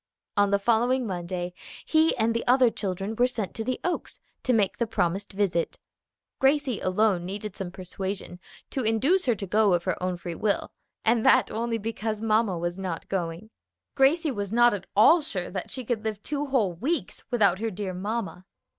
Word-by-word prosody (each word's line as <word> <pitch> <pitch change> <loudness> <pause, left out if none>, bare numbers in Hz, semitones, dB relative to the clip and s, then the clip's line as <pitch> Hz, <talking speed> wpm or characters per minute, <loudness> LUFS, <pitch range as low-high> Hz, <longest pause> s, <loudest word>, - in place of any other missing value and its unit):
On 205 -1 +4
the 200 - +3
following 240 +5 +2
Monday 175 -2 -4 0.3
he 315 -1 +3
and 225 0 +2
the 230 - -1
other 250 -1 +5
children 195 +1 -3
were 245 +2 +4
sent 220 -6 -4
to 225 - -4
the 255 +2 -2
Oaks 360 - -3 0.2
to 255 - 0
make 210 -5 +2
the 235 - +1
promised 195 -2 -1
visit. 190 -4 0 0.6
Gracie 270 -3 +2
alone 185 -1 +2
needed 200 +2 -5
some 190 -2 -4
persuasion 185 0 -5 0.3
to 265 - -1
induce 255 - +2
her 240 - +3
to 195 - -5
go 205 0 +3
of 175 - -2
her 185 - -2
own 180 -1 -1
free 175 0 -6
will, 205 +4 -1 0.3
and 230 0 +3
that - - +5
only 230 +1 -1
because 220 0 -3
mamma 215 -3 +2
was 175 +2 -3
not 180 -4 -4
going. 180 +3 -3 0.4
Gracie 295 +3 +3
was 205 -5 -4
not 240 0 +5
at 195 -2 -5
all 315 +12 +7
sure 195 - -4
that 185 -1 -4
she 255 -2 -6
could 220 -2 -2
live 215 -2 -3
two 290 0 -2
whole 230 -10 +1
weeks 280 - -2
without 200 -7 +3
her 225 +1 -1
dear 195 -2 -4
mamma. 195 -1 -4
215 Hz, 190 wpm, -26 LUFS, 185-240 Hz, 0.6 s, all